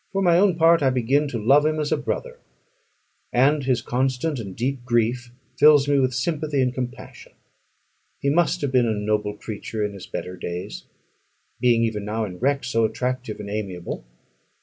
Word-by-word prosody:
For 195 Hz, 0 st, 0 dB
my 175 Hz, -1 st, +5 dB
own 195 Hz, -3 st, +4 dB
part, 165 Hz, 0 st, +5 dB
I 135 Hz, -, +4 dB
begin 130 Hz, +4 st, +1 dB
to 130 Hz, -, -4 dB
love 135 Hz, +7 st, +4 dB
him 155 Hz, 0 st, 0 dB
as 150 Hz, -1 st, -2 dB
a -, -, +4 dB
brother; 480 Hz, -, -4 dB, 0.9 s
and 140 Hz, +4 st, +3 dB
his 125 Hz, -3 st, +1 dB
constant 130 Hz, +3 st, -1 dB
and 100 Hz, -4 st, -7 dB
deep 130 Hz, +1 st, -2 dB
grief 120 Hz, 0 st, 0 dB, 0.3 s
fills 145 Hz, -2 st, +6 dB
me 145 Hz, -1 st, +3 dB
with 130 Hz, -2 st, +1 dB
sympathy 150 Hz, +2 st, -1 dB
and 125 Hz, -1 st, +1 dB
compassion. 125 Hz, -1 st, -7 dB, 0.9 s
He 140 Hz, -, +1 dB
must 175 Hz, +3 st, +2 dB
have 140 Hz, -3 st, -1 dB
been 125 Hz, -2 st, +3 dB
a 110 Hz, -, 0 dB
noble 105 Hz, 0 st, -1 dB
creature 105 Hz, 0 st, -4 dB
in 105 Hz, -, -4 dB
his 95 Hz, -2 st, -10 dB
better 90 Hz, -, -5 dB
days, 85 Hz, -8 st, -6 dB, 0.7 s
being 120 Hz, -2 st, +3 dB
even 110 Hz, -3 st, -1 dB
now 110 Hz, +2 st, -2 dB
in 90 Hz, -3 st, -8 dB
wreck 140 Hz, +2 st, +1 dB
so 115 Hz, -2 st, 0 dB
attractive 125 Hz, 0 st, -2 dB
and 100 Hz, -1 st, -6 dB
amiable. 95 Hz, -, -5 dB
125 Hz, 180 wpm, -23 LUFS, 110-145 Hz, 0.9 s, fills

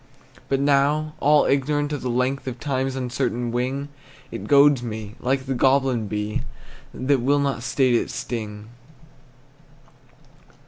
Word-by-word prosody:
But 135 Hz, -, +1 dB
now, 145 Hz, +2 st, +2 dB
all 150 Hz, +1 st, +4 dB
ignorant 145 Hz, +2 st, 0 dB
of 145 Hz, -, -3 dB
the 125 Hz, -, -3 dB
length 130 Hz, +3 st, -1 dB
Of 125 Hz, -1 st, -5 dB
time's 135 Hz, -2 st, -2 dB
uncertain 125 Hz, -2 st, -2 dB
wing, 130 Hz, +4 st, -2 dB, 0.4 s
It -, -, -6 dB
goads 140 Hz, -2 st, +5 dB
me, 110 Hz, -3 st, -6 dB
like 130 Hz, +1 st, -1 dB
the 135 Hz, -, -2 dB
goblin 130 Hz, -3 st, +2 dB
bee, 105 Hz, +1 st, -2 dB, 0.5 s
That 130 Hz, 0 st, 0 dB
will 140 Hz, +4 st, +2 dB
not 140 Hz, -4 st, -1 dB
state 130 Hz, +1 st, +1 dB
its 120 Hz, -, 0 dB
sting. 105 Hz, -2 st, -5 dB
130 Hz, 135 wpm, -23 LUFS, 120-140 Hz, 0.5 s, goads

